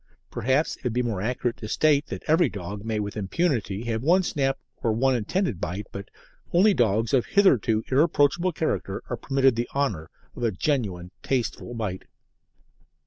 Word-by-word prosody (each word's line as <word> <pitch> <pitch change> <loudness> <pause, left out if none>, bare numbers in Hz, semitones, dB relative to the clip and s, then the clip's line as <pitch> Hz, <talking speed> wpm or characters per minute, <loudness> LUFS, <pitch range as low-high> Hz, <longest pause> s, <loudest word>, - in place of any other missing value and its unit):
Perhaps 130 +6 0
it - - -27
would 125 -3 -1
be 125 +1 +1
more 110 -6 -2
accurate 120 +2 -1
to 110 - -7
state 145 +4 +2
that - - -6
every 160 +3 +3
dog 100 +1 -7
may 110 -1 -2
with 105 -1 -4
impunity 110 - -1
have 115 -2 -2
one 175 +7 +4
snap 135 -5 0 0.2
or 115 - +1
one 130 +3 +2
intended 120 - -1
bite, 90 +4 -3
but 100 0 -8 0.4
only 195 +4 +5
dogs 115 - +1
of 130 -3 +3
hitherto 120 - +3
irreproachable 155 +4 +3
character 100 -11 -2
are 120 - -1
permitted 135 +1 +2
the 120 +1 -2
honour 105 - -1 0.3
of - - -8
a 115 -2 +1
genuine 95 - -2
tasteful 120 -1 -2
bite. 100 -5 -4
120 Hz, 170 wpm, -25 LUFS, 105-140 Hz, 0.4 s, only